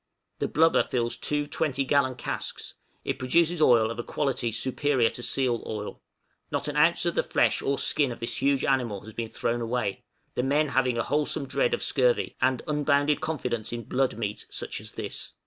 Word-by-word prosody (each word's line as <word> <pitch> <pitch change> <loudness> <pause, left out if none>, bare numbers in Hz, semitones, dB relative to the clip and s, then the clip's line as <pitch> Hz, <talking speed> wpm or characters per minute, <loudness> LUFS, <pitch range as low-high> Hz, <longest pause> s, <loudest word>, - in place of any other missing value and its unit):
The - - 0
blubber 165 +1 +4
fills 120 -2 -1
two 150 0 0
twenty 145 -2 -1
gallon 130 -2 +2
casks; 120 - -5 0.3
it - - -2
produces 165 +5 +2
oil 115 -5 +5
of 115 - -6
a - - -2
quality 130 -5 -1
superior 130 +1 +1
to - - -7
seal 120 -2 +1
oil; 105 -1 -5 0.5
not 140 - -2
an 145 - -3
ounce 160 +4 +4
of 170 - +1
the - - +2
flesh - - +1
or 140 0 0
skin 145 -4 +2
of 120 - -7
this 115 - -3
huge 140 0 +2
animal 120 -7 0
has 110 +2 -11
been 115 0 -4
thrown 120 +2 -1
away, 115 -4 -2 0.3
the - - 0
men 145 +3 +2
having 130 -3 +1
a 115 - +1
wholesome 145 0 0
dread 475 - +1
of - - -6
scurvy, - - +1
and 130 -1 +2
unbounded 145 -1 +2
confidence 125 -8 -2
in 120 0 -4
"blood 130 0 0
meat," 105 -2 -4
such - - -5
as - - -12
this! - - -6
130 Hz, 195 wpm, -27 LUFS, 120-150 Hz, 0.5 s, oil